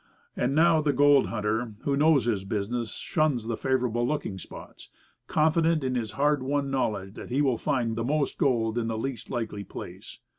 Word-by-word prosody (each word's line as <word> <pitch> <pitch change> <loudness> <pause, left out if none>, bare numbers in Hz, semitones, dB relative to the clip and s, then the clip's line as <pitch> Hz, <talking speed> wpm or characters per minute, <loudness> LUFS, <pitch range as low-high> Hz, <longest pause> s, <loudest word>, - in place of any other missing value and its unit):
And 130 +3 0
now 165 0 +5
the 150 -2 +1
gold 145 0 +5
hunter 110 +1 -2
who 140 - 0
knows 150 -2 +4
his 105 -5 0
business 110 +4 -3
shuns 155 - 0
the 115 0 -2
"favourable 125 -2 0
looking" 140 -10 -3
spots, - - -11 0.4
confident 160 0 +2
in 130 -1 -1
his 115 -4 -2
hard 145 0 +2
won 140 +1 -1
knowledge 105 -7 -1
that - - -9
he 130 +3 0
will 130 -5 +1
find 125 -6 0
the 115 - -2
most 145 +3 -1
gold 115 -4 +1
in 115 - -2
the 115 -1 -2
least 130 +2 -4
likely 110 -4 -3
place. - - -9
125 Hz, 185 wpm, -27 LUFS, 115-145 Hz, 0.4 s, now